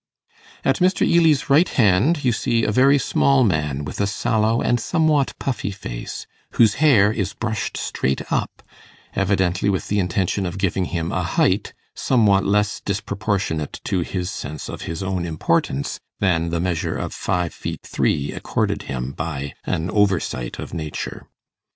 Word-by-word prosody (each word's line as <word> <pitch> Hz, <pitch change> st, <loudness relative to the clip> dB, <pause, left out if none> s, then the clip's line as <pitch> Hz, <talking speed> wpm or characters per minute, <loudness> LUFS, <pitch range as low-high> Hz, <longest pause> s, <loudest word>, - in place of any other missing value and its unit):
At 135 Hz, -, +3 dB
Mr. 185 Hz, +1 st, +3 dB
Ely's 165 Hz, -4 st, +4 dB
right 150 Hz, +6 st, +4 dB
hand 125 Hz, -, +3 dB
you 125 Hz, -, +4 dB
see 115 Hz, 0 st, 0 dB
a -, -, +1 dB
very 135 Hz, +5 st, +5 dB
small 135 Hz, -1 st, +3 dB
man 75 Hz, -, 0 dB
with 75 Hz, -, -4 dB
a 100 Hz, -, +2 dB
sallow 110 Hz, +1 st, +1 dB
and 120 Hz, -, +1 dB
somewhat 155 Hz, 0 st, +1 dB
puffy 120 Hz, -7 st, -2 dB
face, -, -, -6 dB, 0.3 s
whose 110 Hz, -3 st, +5 dB
hair 110 Hz, -10 st, +6 dB
is 100 Hz, -3 st, -3 dB
brushed 110 Hz, -3 st, -3 dB
straight 65 Hz, +1 st, -1 dB
up, -, -, -2 dB, 0.5 s
evidently 95 Hz, -1 st, +1 dB
with 95 Hz, -2 st, -2 dB
the 105 Hz, -, +1 dB
intention 95 Hz, +1 st, 0 dB
of 90 Hz, +2 st, -5 dB
giving 95 Hz, -1 st, 0 dB
him 85 Hz, -2 st, -3 dB
a -, -, 0 dB
height -, -, +1 dB, 0.2 s
somewhat 105 Hz, -6 st, +3 dB
less 105 Hz, +1 st, +1 dB
disproportionate 100 Hz, -5 st, -2 dB
to 95 Hz, -, 0 dB
his 90 Hz, +1 st, -3 dB
sense 75 Hz, 0 st, -6 dB
of -, -, -6 dB
his 80 Hz, +2 st, -4 dB
own 95 Hz, -2 st, -2 dB
importance 80 Hz, -4 st, -1 dB, 0.2 s
than 85 Hz, -4 st, +1 dB
the 85 Hz, 0 st, -1 dB
measure 85 Hz, -2 st, -1 dB
of -, -, -4 dB
five 90 Hz, -2 st, -1 dB
feet -, -, -6 dB
three 70 Hz, 0 st, 0 dB
accorded -, -, -1 dB
him 65 Hz, 0 st, -3 dB
by 70 Hz, -2 st, -4 dB
an 80 Hz, +2 st, -1 dB
oversight 95 Hz, -, 0 dB
of -, -, -7 dB
nature. 80 Hz, -2 st, -5 dB
100 Hz, 155 wpm, -22 LUFS, 85-115 Hz, 0.5 s, hair